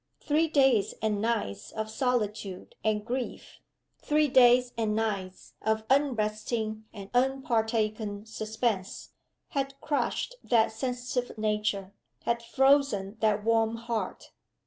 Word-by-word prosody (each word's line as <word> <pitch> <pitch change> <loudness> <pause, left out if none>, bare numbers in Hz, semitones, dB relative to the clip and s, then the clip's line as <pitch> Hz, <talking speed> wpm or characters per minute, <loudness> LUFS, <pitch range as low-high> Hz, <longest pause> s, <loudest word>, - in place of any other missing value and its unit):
Three 310 +2 +2
days 270 -8 +3
and 210 -2 0
nights 210 - -2
of 220 0 -3
solitude 215 -6 -2
and 210 -1 0
grief, 250 +1 -4 0.4
three 300 0 +2
days 250 -1 +6
and 220 -2 0
nights 200 -4 -3
of 220 0 0
unresting 220 -4 0
and 200 -1 -10
unpartaken 220 -5 0
suspense, 220 -2 -3 0.4
had 275 0 -3
crushed 300 - -1
that 230 -3 +3
sensitive 245 +1 -3
nature, 210 -2 -1 0.3
had 235 0 0
frozen 235 -5 +2
that 215 -2 +2
warm 225 0 +2
heart. 230 -1 -4
225 Hz, 110 wpm, -29 LUFS, 215-250 Hz, 0.4 s, days